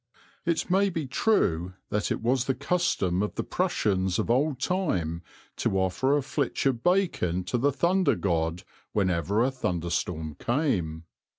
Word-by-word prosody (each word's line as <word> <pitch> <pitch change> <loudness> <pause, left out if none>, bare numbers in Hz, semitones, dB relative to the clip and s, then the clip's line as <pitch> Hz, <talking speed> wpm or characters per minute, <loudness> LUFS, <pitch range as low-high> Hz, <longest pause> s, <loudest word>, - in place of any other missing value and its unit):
It 170 -1 +1
may 195 +2 +4
be 165 -5 -3
true 95 - +1 0.2
that 105 0 0
it - - -2
was 125 +1 +2
the 135 - 0
custom 140 - 0
of 105 - -2
the - - -1
Prussians 95 -3 0
of - - 0
old 135 +2 +1
time 95 - -1 0.4
to 95 - 0
offer 95 +10 +2
a 145 - -1
flitch 140 0 -2
of 130 -4 +1
bacon 170 - +1
to 120 +7 -1
the 140 +4 +3
thunder 170 +2 +2
god 85 -2 -1 0.3
whenever 95 +1 +1
a 130 - +1
thunderstorm 85 - -2
came. 100 - 0
115 Hz, 155 wpm, -27 LUFS, 90-145 Hz, 0.4 s, may